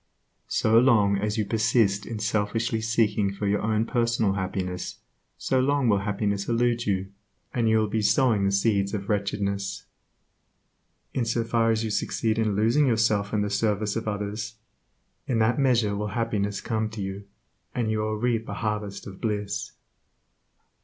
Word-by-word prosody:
So 110 +1 +3
long 105 -6 +4
as 105 +1 -1
you 110 - +1
persist 105 -1 +2
in 115 - -4
selfishly 110 +2 -1
seeking 110 -3 +1
for 100 +1 -4
your 100 0 +1
own 110 +1 +1
personal 115 -4 +1
happiness, 95 -1 -3 0.4
so 130 - 0
long 140 0 +2
will 100 -2 +3
happiness 100 0 -1
elude 120 0 +1
you, 95 -1 -1 0.4
and 115 -2 +1
you 110 - +4
will 110 -1 +2
be 110 +1 -1
sowing 110 0 +3
the 100 - +2
seeds 100 0 +1
of 100 -1 -5
wretchedness. 100 -1 -2 1.3
In 130 - 0
so 115 0 0
far 115 0 +1
as 110 0 +1
you 110 - -2
succeed 110 +1 0
in 110 -3 +1
losing 115 +8 +3
yourself 110 -4 +2
in 105 -1 +1
the 105 - -2
service 105 0 0
of 115 -1 -3
others, 105 +1 -3 0.7
in 120 - +1
that 115 +4 +2
measure 120 -6 +2
will 105 +1 -2
happiness 105 -3 -1
come 110 -1 -1
to 110 -1 -7
you, 95 +1 -6 0.5
and 115 -3 0
you 110 - 0
will 110 0 -1
reap 115 0 -1
a - - -4
harvest 105 -2 -3
of 95 -2 -10
bliss. 105 -1 -2
110 Hz, 165 wpm, -26 LUFS, 100-115 Hz, 1.3 s, long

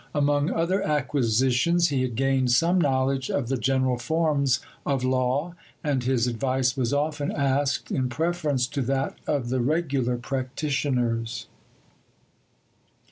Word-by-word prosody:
Among 145 0 +2
other 180 +4 0
acquisitions, 140 - +2
he 135 -3 0
had 125 -3 -2
gained 135 0 +1
some 170 +8 +3
knowledge 135 -2 +1
of 130 -4 -1
the 135 - +1
general 130 +1 +1
forms 140 -1 +1 0.2
of 135 -3 -1
law, 130 +6 0 0.3
and 140 -5 0
his 125 -2 +1
advice 130 +1 0
was 125 -4 -1
often 145 0 -1
asked 140 0 0
in 130 -2 0
preference 155 -3 0
to 140 +2 -3
that 135 +2 -1
of 140 -5 -1
the 130 +1 0
regular 135 -3 0
practitioners. 125 -3 -2
135 Hz, 130 wpm, -25 LUFS, 125-145 Hz, 0.3 s, some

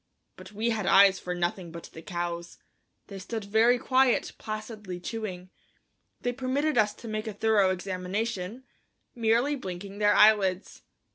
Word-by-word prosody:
But - - -12
we 220 +3 -1
had 215 -4 -2
eyes 195 -1 +6
for 180 0 -4
nothing 175 0 -2
but 170 0 -10
the 160 - -9
cows; 170 0 -5 0.5
they 195 -1 -9
stood 220 +3 -5
very 225 +4 +4
quiet, 260 +1 +2
placidly 215 -4 -6
chewing. 185 -3 -6 0.7
They 245 - -1
permitted 275 +4 -1
us 215 -3 +2
to 235 - -11
make 215 0 -4
a 215 - -4
thorough 205 -2 +3
examination, 185 +4 -3 0.5
merely 235 +5 +2
blinking 195 -3 -7
their 205 0 +4
eyelids. 200 -3 +3
210 Hz, 145 wpm, -28 LUFS, 185-225 Hz, 0.7 s, eyes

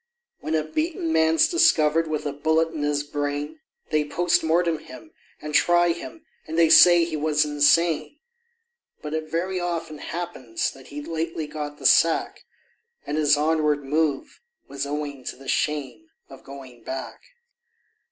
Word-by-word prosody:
When 155 - -3
a 155 - +1
beaten 305 - -2
man's 160 0 +4
discovered 165 - +3
with 155 -1 -3
a 145 - -2
bullet 160 +3 +1
in 155 - -5
his 145 0 0
brain, 145 - -4 0.3
They 155 -1 +2
POST 175 +4 +1
MORTEM 165 0 +1
him, 155 +2 -13 0.3
and 150 0 -7
try 175 +2 +4
him, 310 - -8 0.2
and 160 +1 -5
they 165 -1 +5
say 175 -1 +8
he 165 -2 -5
was 150 0 +1
insane; 155 - +2 0.9
But 150 0 -5
it 155 0 -4
very 185 +3 -2
often 165 -3 -4
happens 165 -10 -4
that 135 -1 -15
he'd 145 +1 -8
lately 165 -1 -3
got 150 -1 -6
the - - -11
sack, 165 -1 +3 0.6
And 145 - -3
his 150 -1 +3
onward 150 -1 +1
move 145 0 -2 0.3
was 140 0 -5
owing 145 -2 -5
to - - -5
the 135 +1 -14
shame 150 - -2 0.2
of - - -13
going 135 -3 -12
back. 130 0 -7
155 Hz, 155 wpm, -24 LUFS, 145-165 Hz, 0.9 s, say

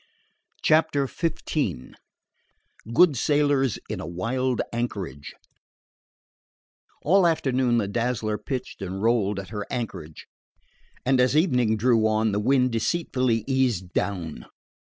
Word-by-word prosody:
CHAPTER 155 -3 +3
XV 140 - -3 1.0
GOOD 155 +4 +5
SAILORS 145 -2 +2
IN - - -4
A - - -6
WILD 125 +8 -1
ANCHORAGE 100 -11 -4 1.7
All 185 +3 +4
afternoon 130 -6 +1
the 105 -4 0
Dazzler 110 0 -1
pitched 130 -5 -5
and 95 +1 -4
rolled 105 -4 +1
at 95 - -8
her 105 -1 -4
anchorage, 100 -11 -6 0.8
and 130 0 +3
as 130 +3 +3
evening 125 - +2
drew 115 -1 +3
on 110 0 +1
the 100 - 0
wind 125 +3 +2
deceitfully 120 -2 0
eased 125 -10 0
down. 85 -9 -3
120 Hz, 110 wpm, -25 LUFS, 105-135 Hz, 1.7 s, GOOD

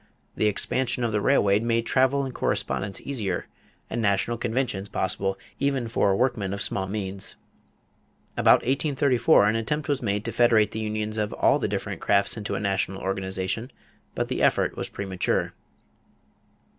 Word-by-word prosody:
The 110 - +2
expansion 125 +4 0
of 115 - 0
the 105 -1 0
railway 100 -5 +3
made 115 0 0
travel 130 +2 +2
and 130 - -6
correspondence 95 -4 -2
easier 105 -10 -3 0.4
and 120 - -3
national 100 +3 +1
conventions 115 -5 -2
possible 95 +1 -1 0.2
even 135 -3 0
for 100 -3 +2
workmen 105 -5 0
of 100 - -5
small 95 0 -1
means. 95 -1 -4 1.0
About - - +5
1834 135 -1 +3
an 105 +2 +2
attempt 150 +7 -2
was 145 -3 0
made 105 -2 -1
to - - -2
federate 115 -3 +4
the 110 - -4
unions 110 0 -2
of 105 0 -1
all - - +3
the - - 0
different - - -4
crafts 100 0 +2
into 105 -2 -4
a - - -2
national 95 -1 -1
organization; 95 +4 -2 0.5
but - - -1
the - - -2
effort - - +2
was - - -4
premature. 95 -2 -2
110 Hz, 155 wpm, -25 LUFS, 100-125 Hz, 1.0 s, About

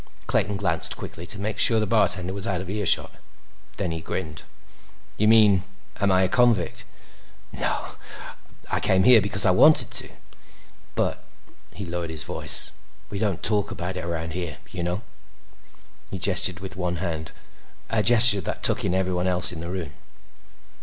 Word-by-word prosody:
Clayton 100 0 -1
glanced 85 -5 -3
quickly 85 +1 -9
to 100 - -3
make 105 +2 -5
sure 115 -2 +5
the 110 - -1
bartender 95 -4 +1
was 100 0 -2
out 95 -3 -2
of 95 +1 -7
earshot. 105 -2 +1 0.7
Then 90 -4 -3
he 80 0 -5
grinned. 80 0 -6 0.7
"You 105 - 0
mean 105 -4 +5 0.4
am 100 -1 +1
I 95 0 +2
a - - +1
convict? 115 -3 0 0.7
Nah. - - -4 0.8
I - - 0
came 95 0 +1
here 120 0 +6
because 100 +1 -1
I 95 - +4
wanted 150 +12 +4
to. - - -2 0.9
But—" - - -2 0.5
He 95 +4 -8
lowered 85 -1 -5
his 80 -2 -1
voice. - - +4 0.4
"—we 100 - -5
don't 100 -5 -3
talk 105 -2 +1
about 90 +2 -6
it 90 - -6
around 80 -1 -5
here. 85 -4 -6
You 90 - -6
know." 90 +4 -3 1.1
He 95 - -6
gestured 95 -1 +2
with 95 -1 -9
one 90 -1 -3
hand—a 85 +5 -7
gesture 115 -2 +7
that - - -6
took - - +2
in 90 - -1
everyone 90 -1 -1
else 90 -1 +6
in 85 - -8
the 85 +1 -7
room. 90 -6 -6
95 Hz, 165 wpm, -23 LUFS, 85-100 Hz, 1.1 s, gesture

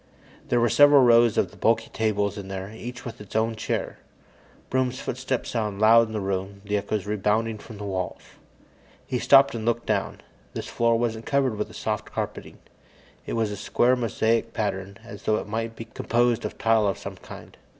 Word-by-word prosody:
There 120 - +3
were 120 - +3
several 145 +2 +6
rows 120 -2 +5
of 90 - +1
the - - -16
bulky 115 0 +1
tables 105 -2 0
in 100 -2 -7
here, 95 +2 -6
each 120 +2 -8
with 115 -2 -7
its 105 - -12
own 110 +1 +1
chair. 110 - -3 0.7
Broom's 130 0 0
footsteps 130 0 -3
sounded 105 -4 -2
loud 115 +2 +6
in 110 - -9
the 110 - -1
room, 95 0 -4
the 105 0 -1
echoes 105 0 -2
rebounding 105 +2 0
from 110 0 -11
the 105 - -7
walls. 95 -2 -3 0.9
He 125 - -2
stopped 135 -3 +6
and 115 -2 -4
looked 120 +1 0
down. 105 -3 -1 0.3
This - - -4
floor 115 0 +2
wasn't 115 -1 -2
covered 135 -5 +1
with 105 - -3
the - - -14
soft - - -3
carpeting; - - -5 0.7
it - - -3
had 115 -1 +1
a 105 - -4
square, 120 +5 +2
mosaic 115 -1 0
pattern, 100 -2 -3
as 115 - -10
though 110 - +1
it - - -4
might 115 +2 -3
be 115 - -7
composed 120 +1 0
of - - -5
tile 115 -2 +3
of 100 - -1
some - - -8
kind. - - -12
110 Hz, 195 wpm, -25 LUFS, 105-120 Hz, 0.9 s, several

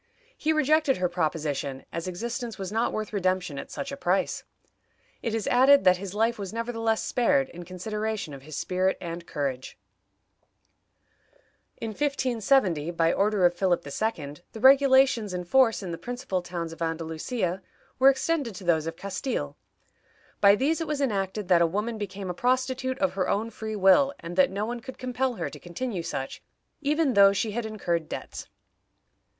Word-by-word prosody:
He 310 - 0
rejected 310 -2 +3
her 180 0 +1
proposition, 150 -5 -2
as 170 +1 -4
existence 235 +5 -4
was 190 -1 -5
not 225 +2 +1
worth 215 0 -4
redemption 185 -6 0
at - - -8
such 275 - -5
a - - -4
price. 195 -8 0 0.8
It 225 -1 -2
is 225 - -2
added 265 +2 +6
that 185 -1 +5
his 195 +1 -7
life 225 +1 +1
was 195 -2 -5
nevertheless 225 -1 -1
spared, 270 +2 +2
in 175 0 -10
consideration 210 0 -4
of 135 - -9
his 150 +2 -9
spirit 185 +1 0
and 170 0 -6
courage. 135 -3 -4 2.0
In 225 - -4
1570, 240 - +1
by 165 -1 +2
order 200 -2 +2
of 175 - +4
Philip 175 -2 0
II., 145 -3 -3 0.2
the 225 - -7
regulations 265 -5 +5
in 180 - -3
force 225 +2 +3
in 180 - -5
the 165 - -5
principal 245 -6 -3
towns 170 -2 -5
of 165 - -14
Andalusia 165 +4 -2 0.4
were 265 +1 +8
extended 275 - 0
to 190 - -9
those 165 -3 +2
of 165 - -4
Castile. 200 +9 -4 0.8
By 200 0 +7
these 295 +8 0
it 325 - -2
was 300 -2 -2
enacted 205 -6 -1
that 175 -2 +5
a 170 - +5
woman 210 +6 -2
became 195 -2 -4
a - - -4
prostitute 260 +3 0
of 280 - 0
her 190 -1 -1
own 220 +3 0
free 220 -1 -5
will, 210 +9 +5
and 170 +1 -7
that 185 - +5
no 200 +2 -2
one 240 +2 -4
could 260 +2 -10
compel 255 0 -1
her - - -4
to - - -10
continue 185 +2 -4
such, 135 -4 -5 0.4
even 300 -1 +1
though 200 -1 +7
she 215 +2 -1
had 225 +1 -3
incurred 175 -7 -2
debts. - - -7
205 Hz, 175 wpm, -27 LUFS, 175-250 Hz, 2.0 s, were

